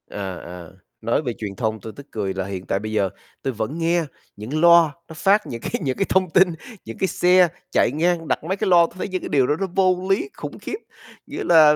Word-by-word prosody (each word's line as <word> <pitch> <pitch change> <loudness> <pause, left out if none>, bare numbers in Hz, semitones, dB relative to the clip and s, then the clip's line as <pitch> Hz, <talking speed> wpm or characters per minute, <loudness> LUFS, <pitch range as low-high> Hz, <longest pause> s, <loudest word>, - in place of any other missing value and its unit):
À, 95 -3 -5
à, 85 -1 -9 0.3
nói 115 - +1
về 125 -6 -3
truyền 100 -3 -5
thông, 110 +2 -2
tui 110 - -8
tức 140 0 -12
cười 100 -3 -2
là 95 -1 -3
hiện 95 -1 -6
tại 95 - 0
bây 110 +1 -5
giờ 100 -3 +1 0.3
tui 135 - -2
vẫn 115 +8 -3
nghe 170 +1 +1 0.3
những 125 +10 -4
loa 170 -2 +7 0.2
nó 160 - -10
phát 200 +6 +3
những 115 -2 -6
cái - - -5
những 130 -3 -1
cái 195 - +1
thông 185 -1 +2
tin, 185 +2 +5 0.4
những 115 - -8
cái 190 - +1
xe 180 0 +4 0.2
chạy - - +3
ngang, 165 +1 +1
đặt 135 - -1
mấy 190 +5 -2
cái 210 -1 -1
loa, 170 -2 +7
tui - - -18
thấy - - -3
những 185 -1 -3
cái - - -6
điều 135 -4 +3
đó 150 - +2
nó 195 - -1
vô 185 -1 +2
lý 205 - +1
khủng - - -7
khiếp. 410 - -5 0.5
Nghĩa - - -5
là 155 -3 +6
155 Hz, 250 wpm, -22 LUFS, 110-180 Hz, 0.5 s, loa